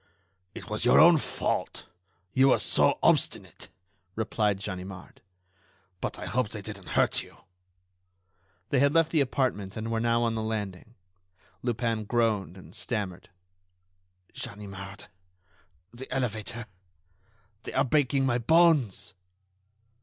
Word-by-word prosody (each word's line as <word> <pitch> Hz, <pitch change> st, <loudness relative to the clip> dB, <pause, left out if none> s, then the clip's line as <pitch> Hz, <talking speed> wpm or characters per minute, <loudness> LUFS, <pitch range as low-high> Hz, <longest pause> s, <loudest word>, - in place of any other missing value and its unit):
"It -, -, -8 dB
was 105 Hz, +1 st, -2 dB
your 120 Hz, -, +6 dB
own 170 Hz, +1 st, +8 dB
fault; -, -, -2 dB, 0.5 s
you 135 Hz, +1 st, +5 dB
were 135 Hz, -, +5 dB
so -, -, +3 dB
obstinate," -, -, +1 dB, 0.5 s
replied 105 Hz, -2 st, 0 dB
Ganimard. 95 Hz, -1 st, -7 dB, 0.8 s
"But -, -, -4 dB
I -, -, -6 dB
hope 125 Hz, -3 st, 0 dB
they 105 Hz, -2 st, -6 dB
didn't 100 Hz, -3 st, -8 dB
hurt -, -, +3 dB
you." -, -, -14 dB, 1.3 s
They 140 Hz, -, +2 dB
had 140 Hz, +3 st, +3 dB
left 165 Hz, -1 st, +4 dB
the 155 Hz, -, +3 dB
apartment 120 Hz, -7 st, -1 dB
and 110 Hz, +1 st, -4 dB
were 115 Hz, -, 0 dB
now 115 Hz, +1 st, +2 dB
on 115 Hz, -1 st, +1 dB
the 110 Hz, -, -2 dB
landing. 110 Hz, -1 st, -4 dB, 0.7 s
Lupin 115 Hz, -2 st, -1 dB
groaned 105 Hz, -5 st, 0 dB
and 95 Hz, -, -14 dB
stammered: 100 Hz, -7 st, -4 dB, 1.0 s
"Ganimard... 100 Hz, -3 st, -7 dB, 0.9 s
the 130 Hz, +3 st, -7 dB
elevator... 120 Hz, -2 st, -3 dB, 1.0 s
they -, -, -8 dB
are -, -, +2 dB
breaking 135 Hz, 0 st, +2 dB
my 125 Hz, -2 st, +1 dB
bones." 130 Hz, -, +3 dB
115 Hz, 125 wpm, -28 LUFS, 105-130 Hz, 1.3 s, own